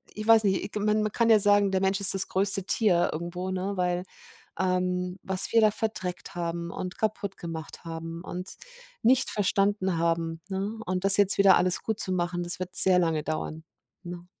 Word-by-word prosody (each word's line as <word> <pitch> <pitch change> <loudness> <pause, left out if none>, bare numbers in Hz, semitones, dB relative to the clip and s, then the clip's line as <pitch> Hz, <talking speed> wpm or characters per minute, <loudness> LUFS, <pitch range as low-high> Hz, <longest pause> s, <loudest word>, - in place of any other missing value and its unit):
Ich 215 - -6
weiß 225 -1 +6
nicht, 190 -1 0
i - - -6
k 210 - -5
man 210 +1 0
man 215 - -2
kann 230 +1 0
ja 220 - +6
sagen, 205 -1 +4
der 190 - -1
Mensch 195 +1 0
ist 195 - +8
das 195 - +4
größte 195 0 +3
Tier 185 -5 +1
irgendwo, 175 +3 -5
ne, 190 +2 -3
weil, 180 0 -1 0.6
ähm, 180 0 -2
was 190 -1 -2
wir 230 - +4
da 215 - +4
verdreckt 205 -4 -5
haben 170 0 -5
und 185 -1 -7
kaputtgemacht 195 -8 -5
haben 165 0 -8
und 180 0 -7 0.5
nicht 250 +3 +2
verstanden 195 -2 0
haben, 165 0 -2
ne, 200 +3 -4
und 185 +1 -3
das 195 0 +9
jetzt 200 -1 +3
wieder 195 -1 +5
alles 180 0 +1
gutzumachen, 185 -5 -2
das 175 +1 -2
wird 185 0 -6
sehr 185 -1 +5
lange 165 -3 0
dauern, 155 0 -5 0.4
ne? 175 -1 -10
185 Hz, 185 wpm, -26 LUFS, 175-200 Hz, 0.6 s, das